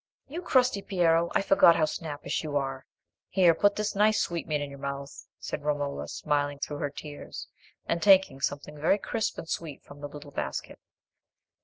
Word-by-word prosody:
"You 325 +6 -5
crusty 255 - +3
Piero! 170 -3 +2
I - - +3
forgot 180 -4 +6
how 155 - +3
snappish 155 -1 -4
you 150 -2 -1
are. 135 -1 -3 0.4
Here, 180 -3 +5
put 205 +4 +3
this 210 0 -1
nice 210 +2 +3
sweetmeat 160 -3 -1
in 145 -1 -4
your 140 - -10
mouth," 140 0 -6
said - - -5
Romola, 145 -1 -2
smiling 145 -1 -1
through 145 +1 -4
her 145 - -1
tears, 145 +1 -8 0.4
and 170 0 -1
taking 190 -9 +5
something 145 +1 -3
very 170 +6 +4
crisp 220 +2 -2
and 165 - -7
sweet 160 -4 -5
from 145 0 -14
the 145 - -5
little 145 0 -10
basket. - - -4
155 Hz, 175 wpm, -28 LUFS, 145-190 Hz, 0.4 s, forgot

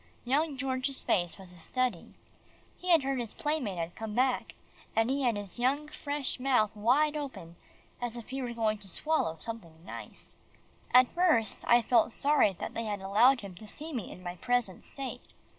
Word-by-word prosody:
Young 285 +3 +1
George's 260 0 -1
face 175 -3 +1
was 190 -2 -9
a 180 - -13
study. 250 0 -2 0.6
He 365 - -5
had 330 -5 +6
heard 270 0 0
that - - 0
his 230 -3 -5
playmate 295 - -1
had 170 +1 -3
come 220 -1 -5
back, 255 0 +1 0.4
and 225 +3 +3
he 280 +1 0
had 240 -4 +2
his 205 0 -7 0.4
fresh 285 -3 -3
young - - -8
mouth 235 -6 +3
wide 270 +8 +3
open, 265 - -6 0.5
as 245 -1 -2
if 235 - -9
he 270 +1 -3
were 245 -2 -3
going 215 -2 +1
to 200 - -5
swallow 190 - 0
something 170 -8 -8
nice. - - -10 0.5
At 250 0 +7
first, 330 -11 +2
I 240 0 +6
felt 230 0 +3
sorry 285 -8 +3
that - - -4
they 230 - -3
had 205 -2 -2
allowed 230 +7 +5
him 200 -2 -8
to 210 +5 -11
see 310 +9 -4
me 235 -7 -4
in 180 - -11
my 175 0 -5
present 245 -3 0
state. 270 -2 -5
240 Hz, 190 wpm, -30 LUFS, 205-270 Hz, 0.6 s, At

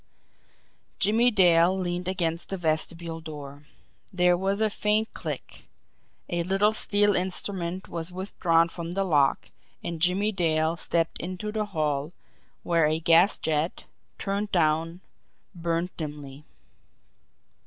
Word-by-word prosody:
Jimmie 225 +5 +4
Dale 180 -3 +4
leaned 180 -1 -3
against 170 -3 -2
the 195 - -2
vestibule 165 0 -2
door 145 -2 -9 0.4
there 180 -2 +3
was 195 +3 -1
a 220 - +3
faint 210 +2 0
click - - -7 0.6
a 175 0 -1
little 195 +4 +3
steel 205 -1 +3
instrument 185 0 -2
was 165 +1 -5
withdrawn 175 -3 +1
from 170 0 -6
the 195 +1 0
lock 145 -7 +1 0.3
and 170 -2 -5
Jimmie 190 +5 +2
Dale 160 -4 +1
stepped 165 -1 -1
into 185 +4 -5
the 215 0 -1
hall, 155 -4 -2 0.5
where 165 -3 +2
a 155 +1 0
gas 170 +4 +4
jet, 160 +1 -2 0.3
turned 200 +1 -2
down, 165 +1 +1 0.5
burned 170 0 -2
dimly. 145 -2 -7
175 Hz, 120 wpm, -26 LUFS, 160-190 Hz, 0.6 s, Jimmie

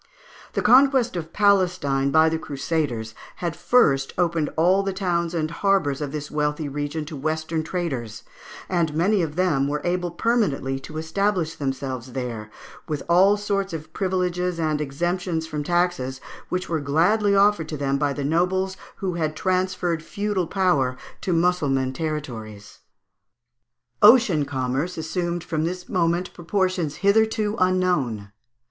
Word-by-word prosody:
The - - -1
conquest 260 -3 +5
of 165 -2 -5
Palestine 180 -9 +2
by 160 +2 +5
the 160 0 0
Crusaders 140 -7 -2 0.2
had 170 -2 -3
first 135 - +2
opened 170 -4 +1
all 180 +4 +4
the 195 -1 -2
towns 175 -3 -1
and 155 -1 -1
harbours 165 -6 +1
of 145 -2 -3
this 150 0 -5
wealthy 150 0 -1
region 145 +2 -3
to 155 +1 -7
Western 155 +2 -2
traders, 140 - -4 0.4
and 170 -4 0
many 190 +5 +2
of 155 -3 -3
them 165 -7 +2
were 150 +1 -1
able 175 0 -1
permanently 170 - 0
to 155 +3 -9
establish 165 +1 0
themselves 130 -3 -4
there, 115 -5 -4 0.4
with 150 -3 -3
all 190 +4 +5
sorts 200 -2 -2
of 155 0 -7
privileges 180 -2 -1
and 155 -2 0
exemptions 170 +3 -2
from 150 -2 -4
taxes, 175 -6 0 0.3
which 180 0 -2
were 165 -2 -1
gladly 180 +9 +2
offered 200 -5 +3
to 155 - -4
them 140 0 0
by 145 -1 +1
the 140 0 -4
nobles 185 +5 +1 0.2
who 190 -2 -3
had 155 -2 -2
transferred 185 -2 0
feudal 200 +1 -2
power 145 -10 +1 0.2
to 185 - -2
Mussulman 150 -7 +1
territories. 125 -9 -6 1.2
Ocean 210 - +6
commerce 135 +6 -2
assumed 170 +1 -2
from 155 -2 -2
this 180 +2 -4
moment 170 0 0
proportions 180 -3 -1
hitherto 215 0 +3
unknown. 175 - +1
165 Hz, 140 wpm, -23 LUFS, 145-185 Hz, 1.2 s, Ocean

